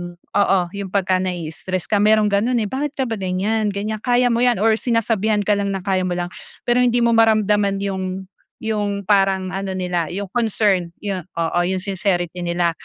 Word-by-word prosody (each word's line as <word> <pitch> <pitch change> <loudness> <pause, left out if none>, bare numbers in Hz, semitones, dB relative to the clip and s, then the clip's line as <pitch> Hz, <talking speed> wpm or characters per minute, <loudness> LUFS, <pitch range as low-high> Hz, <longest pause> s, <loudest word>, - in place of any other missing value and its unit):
oo, 195 +2 +1
'yung 200 0 -5
pagka 185 -1 +1
nai-i-stres 180 0 -3
ka 205 - +3
mayroong 210 0 +4
ganun 220 +5 +1
eh, 230 - +1
bakit 290 +2 -3
ka 270 - 0
ba 225 -4 -3
ganyan? 195 +4 0
Ganyan, 215 +2 -3
kaya 245 +1 +2
mo 230 - +1
'yan 240 -4 +2
or 225 0 +3
sinasabihan 220 -3 +1
ka 205 0 +1
lang 200 -1 -1
na 190 - -5
kaya 190 -2 0
mo 175 - -1
lang. 175 0 -3 0.3
Pero 240 +1 +2
hindi 245 -1 +3
mo 235 - +3
maramdaman 210 -3 +3
'yong 190 -1 -3 0.4
'yong 205 -2 -1
parang 195 -1 +2
ano 195 0 -3
nila, 180 -3 -1
'yong 195 +1 -5
concern 205 -6 +1
yun, 195 -3 -3
oo, 165 +1 0
'yong 190 0 -1
sincerity 180 -3 -1
nila, 170 0 +1
200 Hz, 185 wpm, -20 LUFS, 185-220 Hz, 0.4 s, mayroong